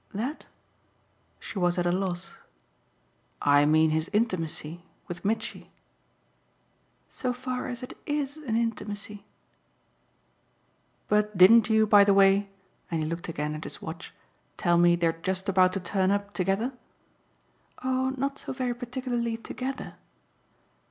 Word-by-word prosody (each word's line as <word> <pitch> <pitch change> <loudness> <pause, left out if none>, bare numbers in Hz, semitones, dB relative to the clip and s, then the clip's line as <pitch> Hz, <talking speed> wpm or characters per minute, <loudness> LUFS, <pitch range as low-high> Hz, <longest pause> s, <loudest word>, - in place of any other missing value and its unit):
"'That'?" 255 +9 -4 0.9
she 200 - -6
was 175 0 +1
at 175 - 0
a 175 - +2
loss. 180 -1 -2 1.1
"I 145 0 +4
mean 155 +1 +4
his 160 +1 -1
intimacy 175 -6 -2 0.2
with 175 -1 -7
Mitchy." 215 +3 -2 1.4
"So 250 -1 -3
far 255 0 -4
as 250 +1 -5
it 250 - -8
IS 290 0 -2
an 265 -8 -3
intimacy." 210 -3 -3 1.8
"But 210 -1 +1
didn't 215 +5 +7
you, 220 0 +4
by 205 -1 +7
the 200 -1 +4
way" 195 +1 +5 0.4
and 165 -2 -1
he - - -2
looked 170 +2 -5
again 150 -1 -3
at 155 +1 -6
his - - -7
watch 165 +3 -8 0.5
"tell 175 -1 +3
me 175 0 +5
they're 170 -1 +1
just 190 +1 -2
about 185 -1 +4
to 195 - -1
turn 185 +1 0
up 200 0 -1
together?" 195 +7 0 1.1
"Oh 260 +1 0
not 275 +1 -2
so - - -6
very 255 -2 -1
particularly 240 -1 -3
together." 260 +3 -6
200 Hz, 135 wpm, -27 LUFS, 175-240 Hz, 1.8 s, didn't